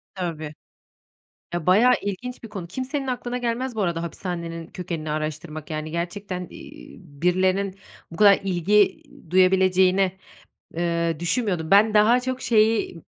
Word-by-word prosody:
Tabii. 160 -5 -4 1.0
Ya, 175 -3 -3
bayağı 215 +8 +5
ilginç 240 +6 -5
bir 230 - -8
konu, 195 -5 -7
kimsenin 260 - -4
aklına 250 -1 -3
gelmez 245 +1 -2
bu 215 - -1
arada 170 -2 -1
hapishanenin 170 -1 -5
kökenini 165 -4 -5
araştırmak. 155 +1 -5
Yani, 155 0 -4
gerçekten, 180 +2 -4
iii, - - -12
birilerinin 185 +4 0 0.4
bu 165 - -9
kadar 200 0 +6
ilgi 195 +2 +2 0.3
duyabileceğini, 185 0 +3 0.6
eee, 170 -1 0
düşünmüyordum. 175 -3 -1
Ben 210 +2 +5
daha 225 +4 +5
çok 255 0 -4
şeyi, 215 -6 +2
185 Hz, 130 wpm, -24 LUFS, 170-210 Hz, 1.0 s, kadar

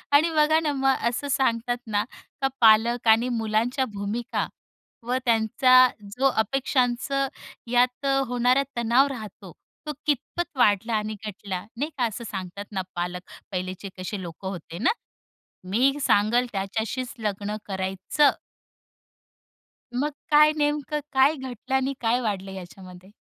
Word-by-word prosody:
आणि 320 +3 +5
बघा 310 +1 +4
ना, 310 -2 0
मग 270 -1 +2
असं 265 +4 -4
सांगतात 245 -3 +1
ना, 210 -1 +1 0.4
का 270 - +3
पालक 230 +2 +5
आणि 225 +3 +5
मुलांच्या 230 +3 0
भूमिका 205 +4 -2 0.6
व 250 +1 +1
त्यांचा 255 +3 +5 0.3
जो 270 - +4
अपेक्षांचं 260 +3 0 0.4
यात 250 +2 +2
अ, 275 0 +3
होणारा 250 +2 +2
तणाव 235 +4 +4
राहतो 215 -8 -8 0.4
तो - - -1
कितपत 300 +3 -2
वाढला 225 -1 +3
आणि 215 0 -1
घटला 195 -2 -5 0.2
नाही 290 +5 -1
का? 250 - +2
असं 230 +1 -4
सांगतात 190 +1 -6
ना 190 -2 -1
पालक 180 +1 -3 0.3
पहिलेचे 185 +1 -4
कसे 185 +2 -5
लोक 175 +1 -9
होते 175 -3 -6
ना, 240 - +3 0.7
"मी 235 +9 +2
सांगेल 235 +3 +3
त्याच्याशीच 220 +6 -3
लग्न 210 -1 -2
करायचं." 190 +9 +1 1.6
मग 290 +4 0 0.2
काय 300 +1 +7
नेमकं 295 0 0
काय 270 +3 +5
घटलं 260 -2 -5
आणि 265 +1 +1
काय 235 +2 +2
वाढलं 195 -4 -3
याच्यामध्ये? 185 0 -11
235 Hz, 130 wpm, -25 LUFS, 200-265 Hz, 1.6 s, काय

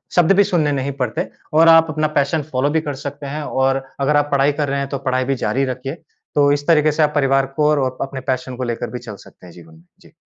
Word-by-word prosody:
शब्द 175 0 +4
भी 205 - +7
सुनने 160 -6 +1
नहीं 140 0 -2
पड़ते 120 -2 -2 0.3
और 160 +2 +5
आप 165 0 +6
अपना 155 0 0
पैशन 140 +3 0
फ़ॉलो 130 +2 +1
भी 160 +2 +1
कर 145 -2 -4
सकते 145 0 -6
हैं। 150 +2 -4
और 135 -1 0 0.2
अगर 145 +2 +2
आप 145 0 +1
पढ़ाई 140 +1 +3
कर 145 - -1
रहे 140 0 -1
हैं 140 - -2
तो 140 - -3
पढ़ाई 130 0 +1
भी 135 +1 0
ज़ारी 135 +1 -1
रखिए। 130 +3 -5 0.4
तो 145 -1 +4
इस 145 0 -1
तरीके 155 -2 +4
से 155 +1 +1
आप 150 0 +1
परिवार 135 -1 +2
को 150 -1 +2
और 130 -4 0
अपने 135 -1 -4
पैशन 130 0 -4
को 130 - -4
लेकर 120 -2 -3
भी 125 - -6
चल 115 -4 -9
सकते 95 - -17
हैं 85 - -13
जीवन 80 -2 -15
में। 80 - -20 0.2
जी। - - -19
140 Hz, 265 wpm, -19 LUFS, 130-150 Hz, 0.4 s, भी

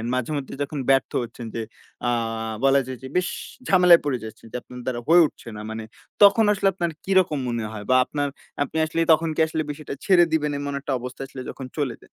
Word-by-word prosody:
মাঝেমধ্যে 135 +2 -3
যখন 145 +1 -5
ব্যর্থ 135 -1 +3
হচ্ছেন 120 0 -8
যে 115 - -2 0.5
আ - - +3 0.5
বলা 135 0 +5
যায় 130 -1 -5
যে - - -5
বেশ 180 - +1 0.4
ঝামেলায় 180 -3 +7
পড়ে 135 -3 0
যাচ্ছেন 110 0 -10
যে - - -9
আপনার 125 - -11
দ্বারা 125 -2 -2
হয়ে 170 +2 +7
উঠছে - - -17
না। 105 - -7
মানে 110 0 -5 0.4
তখন 205 +2 +7
আসলে 195 0 +1
আপনার 170 -2 -2
কিরকম 185 -6 +3
মনে 120 -1 -2
হয় 105 -2 -7
বা 130 - +5
আপনার 145 +1 -2 0.4
আপনি 145 - -5
আসলে 165 +1 -3
তখন 165 +1 +1
কি - - +2
আসলে 160 0 -2
বিষয়টা 145 -1 -7
ছেড়ে 180 -3 +6
দিবেন 150 -2 +1
এমন 145 0 -4
একটা 140 +1 -5
অবস্থা 125 +2 -7
আসলে 135 - -8
যখন 135 - -7
চলে 135 -6 -1
যায়। - - -21
145 Hz, 215 wpm, -24 LUFS, 125-165 Hz, 0.5 s, ঝামেলায়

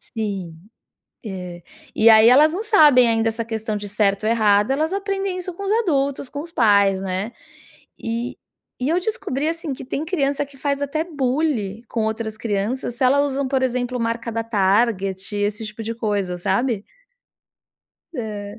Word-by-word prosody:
Sim, 195 -7 -3 0.7
é, 180 -4 -7 0.3
e 225 +1 +6
aí 220 +1 +8
elas 300 +5 +6
não 395 +5 -3
sabem 295 - +6
ainda 225 0 +2
essa 225 +1 -3
questão 220 -1 -3
de 205 0 -5
certo 200 0 +1
ou 220 - +2
errado, 210 0 +3
elas 315 +5 0
aprendem 390 -1 -2
isso 365 0 -5
com 400 - -7
os 400 - 0
adultos, 280 - -1
com 285 - -5
os 335 0 -11
pais, 200 - +4
né. 195 +4 -3 0.7
E 230 +2 -4 0.4
e 265 - 0
eu 345 +2 +2
descobri, 350 - -2
assim, 330 -2 -3
que 255 - -9
tem 280 +3 -3
criança 285 -4 0
que 275 -1 -18
faz 280 +1 -1
até 310 +3 -1
bullying 260 - -1
com 225 -2 -2
outras 220 0 -3
crianças 225 +3 -2
se 260 - -2
elas 275 +3 +4
usam 275 -1 -1
por 265 -1 0
exemplo 250 0 -1
marca 230 0 -2
da 225 0 -2
Target, 195 -2 +1
esse 210 +2 -1
tipo 225 +1 -7
de 230 +1 -3
coisa, 205 -5 -1
sabe. 205 +4 0 1.3
É. 210 -3 -6
230 Hz, 170 wpm, -21 LUFS, 210-280 Hz, 1.3 s, aí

